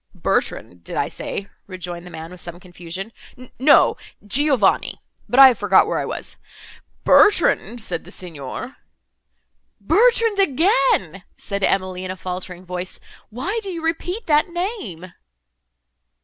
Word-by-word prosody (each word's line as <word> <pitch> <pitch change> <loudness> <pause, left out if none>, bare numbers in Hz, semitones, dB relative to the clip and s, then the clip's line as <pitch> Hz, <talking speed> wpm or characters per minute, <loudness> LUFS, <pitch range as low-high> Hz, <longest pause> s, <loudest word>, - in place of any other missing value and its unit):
"Bertrand, 90 -1 -2
did - - -7
I - - +1
say?" 200 - -5 0.2
rejoined 180 -2 -7
the - - -9
man, 160 0 -9
with 180 - -9
some 175 0 -8
confusion—"No, 195 - 0 0.3
Giovanni. 260 -2 +2 0.3
But 250 - +2
I 270 -1 +11
have 240 - -2
forgot 200 -2 +5
where - - -1
I - - -2
was;—'Bertrand,' 410 - +1
said - - -3
the - - -14
Signor— 175 - -7 1.0
"Bertrand, 460 -2 +3
again!" 270 - +2 0.2
said 200 -1 -3
Emily, 185 -1 0
in 185 - -5
a 185 - -5
faltering 180 0 -6
voice, 180 +1 -5 0.3
"Why 340 - -3
do 400 - -5
you 335 -3 -5
repeat 355 +6 -3
that 300 -1 +3
name?" 340 - -5
200 Hz, 130 wpm, -21 LUFS, -, 1.0 s, I